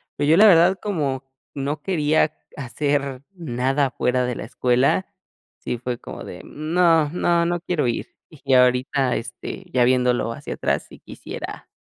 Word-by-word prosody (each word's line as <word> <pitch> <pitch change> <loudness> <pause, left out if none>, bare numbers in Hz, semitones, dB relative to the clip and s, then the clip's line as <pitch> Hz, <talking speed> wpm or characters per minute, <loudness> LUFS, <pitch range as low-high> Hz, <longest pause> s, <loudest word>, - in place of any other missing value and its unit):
pero 145 - -1
yo 165 - +6
la 215 - +8
verdad, 180 0 +6
como 145 -10 -2 0.3
no 145 +2 -3
quería 155 -4 +1 0.2
hacer 140 0 -2
nada 135 -3 0
fuera 125 0 0
de 125 -1 -2
la - - -6
escuela, 125 +9 +1 0.5
sí 120 - -3
fue 120 0 -4
como - - -9
de: - - -9
"Mm, 155 +2 -6
no 165 -4 +4
no 170 0 +1
no 175 0 0
quiero 175 -4 -1
ir", 120 - -4
y 140 -4 -1
ahorita, 125 +1 +3
este, 120 +11 -7
ya 125 -4 +3
viéndolo 125 -1 +2
hacia - - -7
atrás, - - -1
si - - -13
quisiera, - - -9
140 Hz, 160 wpm, -22 LUFS, 125-165 Hz, 0.5 s, la